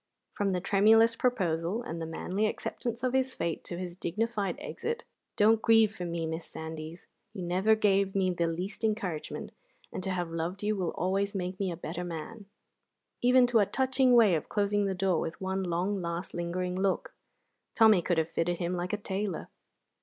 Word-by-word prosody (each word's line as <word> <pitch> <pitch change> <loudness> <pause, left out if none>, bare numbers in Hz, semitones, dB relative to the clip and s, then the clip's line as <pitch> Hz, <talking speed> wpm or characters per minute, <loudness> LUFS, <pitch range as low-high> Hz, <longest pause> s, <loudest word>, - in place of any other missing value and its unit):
From 205 -1 0
the 185 -1 0
tremulous 220 +4 +5
proposal 195 -3 0
and 170 -9 -5
the 165 - -3
manly 185 +6 -1
acceptance 235 +2 -4
of 255 0 +1
his 265 0 +1
fate 170 - -2
to 175 - -5
his 180 -1 -5
dignified 205 +3 -2
exit 465 +9 -4 0.3
("Don't 220 +1 +4
grieve 225 -2 +4
for 180 - -5
me, 170 -1 -2
Miss 160 +1 -4
Sandys; 160 +1 -7 0.3
you 185 - -4
never 185 +5 +3
gave 200 -2 +2
me 190 -2 +2
the 170 -1 0
least 180 +7 -4
encouragement, 205 -8 -2 0.4
and - - -3
to 190 - -3
have 175 -3 -2
loved 170 +4 -3
you 210 +1 +1
will 185 -4 -1
always 195 +3 0
make 185 0 -3
me 195 -2 0
a 170 - -5
better 170 +1 -5
man"), 180 +5 -7 0.7
even 250 +1 +6
to 240 -2 +3
a 205 - +3
touching 260 -1 +2
way 220 -6 +6
of 155 - -1
closing 205 0 +1
the 190 - -1
door 185 -3 +1
with 165 - -4
one 190 0 -2
long, 185 +2 -1
last, 170 +1 -4
lingering 180 +1 -2
look, 190 0 -1 0.6
Tommy 220 -5 +6
could 175 0 0
have 160 0 0
fitted 170 +1 0
him 175 +1 -2
like 180 +1 -3
a - - +1
tailor. 200 -2 -3
190 Hz, 190 wpm, -29 LUFS, 175-215 Hz, 0.7 s, even